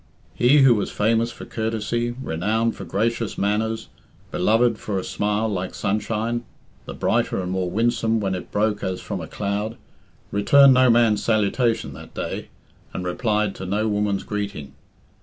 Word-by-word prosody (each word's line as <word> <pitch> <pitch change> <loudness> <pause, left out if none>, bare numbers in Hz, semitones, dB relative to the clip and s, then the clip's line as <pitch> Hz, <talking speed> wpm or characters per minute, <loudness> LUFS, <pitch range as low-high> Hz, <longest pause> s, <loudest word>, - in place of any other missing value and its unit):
He, 135 +4 +5
who 130 -3 +7
was 105 -3 -1
famous 115 +2 +1
for - - -10
courtesy, 115 +1 -2
renowned 110 +7 0
for - - -8
gracious 115 0 -1
manners, 110 +2 -1 0.4
beloved 115 +4 +2
for 100 -2 -3
a 95 - -2
smile 105 +3 -1
like 95 -3 -3
sunshine 115 +3 -1 0.4
the - - -6
brighter - - 0
and 90 -1 -3
more 95 -1 -1
winsome 115 +2 +1
when 95 -2 -1
it 90 - -6
broke 105 0 0
as 95 -1 -2
from 100 -4 -5
a 80 - -7
cloud 105 +5 -3 0.5
returned 135 +7 +6
no 130 0 +5
man's 115 -3 +4
salutation 115 +1 +1
that - - -12
day, - - -4 0.5
and 90 - -4
replied 105 +2 0
to 95 - -7
no 105 +3 0
woman's 105 -2 0
greeting. 100 -8 -5
105 Hz, 160 wpm, -23 LUFS, 100-115 Hz, 0.5 s, who